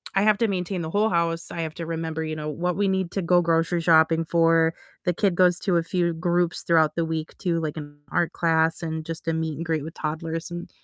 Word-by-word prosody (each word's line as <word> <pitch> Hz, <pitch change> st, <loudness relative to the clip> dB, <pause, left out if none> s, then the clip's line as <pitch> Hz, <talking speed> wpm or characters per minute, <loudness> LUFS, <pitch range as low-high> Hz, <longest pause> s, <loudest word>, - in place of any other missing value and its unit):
I 195 Hz, -, +3 dB
have 215 Hz, -1 st, +4 dB
to 230 Hz, -, +3 dB
maintain 180 Hz, -1 st, -2 dB
the 160 Hz, -, -4 dB
whole 210 Hz, +2 st, +2 dB
house, 170 Hz, -1 st, 0 dB
I 170 Hz, -, -4 dB
have 160 Hz, -1 st, -4 dB
to 165 Hz, -, -5 dB
remember, 160 Hz, -1 st, -3 dB
you 155 Hz, 0 st, -3 dB
know, 150 Hz, 0 st, -4 dB
what 175 Hz, +3 st, -2 dB
we 200 Hz, -1 st, +1 dB
need 190 Hz, -2 st, -1 dB
to 195 Hz, -, -2 dB
go 175 Hz, +1 st, +4 dB
grocery 165 Hz, +1 st, +1 dB
shopping 165 Hz, 0 st, +4 dB
for, 165 Hz, 0 st, +3 dB, 0.3 s
the 180 Hz, -, +2 dB
kid 190 Hz, -1 st, +1 dB
goes 180 Hz, -1 st, +4 dB
to 180 Hz, -4 st, +1 dB
a 165 Hz, -, +1 dB
few 175 Hz, -1 st, 0 dB
groups 175 Hz, +1 st, 0 dB
throughout 160 Hz, -2 st, +3 dB
the 170 Hz, -, 0 dB
week 160 Hz, -1 st, -4 dB
to, 170 Hz, -3 st, 0 dB
like, 155 Hz, 0 st, -4 dB
an 145 Hz, -1 st, -8 dB
art 170 Hz, -, 0 dB
class, 165 Hz, -1 st, +1 dB
and 160 Hz, -1 st, -4 dB
just 165 Hz, 0 st, -6 dB
a -, -, +1 dB
meet 160 Hz, -1 st, -2 dB
and 165 Hz, -, -4 dB
greet 160 Hz, -3 st, -1 dB
with 160 Hz, -, -7 dB
toddlers, 160 Hz, +2 st, -4 dB
and 175 Hz, 0 st, -6 dB
165 Hz, 250 wpm, -24 LUFS, 160-175 Hz, 0.3 s, have